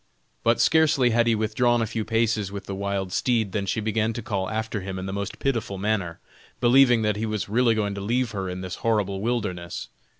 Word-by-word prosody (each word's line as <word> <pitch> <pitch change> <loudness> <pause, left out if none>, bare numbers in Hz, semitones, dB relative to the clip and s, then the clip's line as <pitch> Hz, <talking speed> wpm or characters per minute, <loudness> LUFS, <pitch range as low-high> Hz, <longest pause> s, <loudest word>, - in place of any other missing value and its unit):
But 115 0 +3
scarcely 150 -6 +4
had 120 +1 +3
he 115 - +4
withdrawn 115 +3 +1
a 115 - +1
few 110 0 -3
paces 110 -3 0
with 100 -1 -6
the 100 - -5
wild 100 -1 -2
steed, 115 -5 +1
than 100 0 -2
she 95 - 0
began 110 +1 0
to 120 - -5
call 95 -3 -2
after 110 -1 -3
him 95 0 -5
in 95 - -5
the 95 - -4
most 100 0 -4
pitiful 115 -7 -1
manner, 100 -4 -1 0.4
believing 120 -1 +5
that 105 -1 +1
he 110 +1 -2
was 105 -2 -2
really 115 +2 +3
going 105 -2 -1
to 100 - -5
leave 120 +3 0
her 95 -3 -3
in 90 0 -5
this 90 -1 -5
horrible 100 -4 0
wilderness. 100 -7 -3
110 Hz, 220 wpm, -25 LUFS, 100-115 Hz, 0.4 s, believing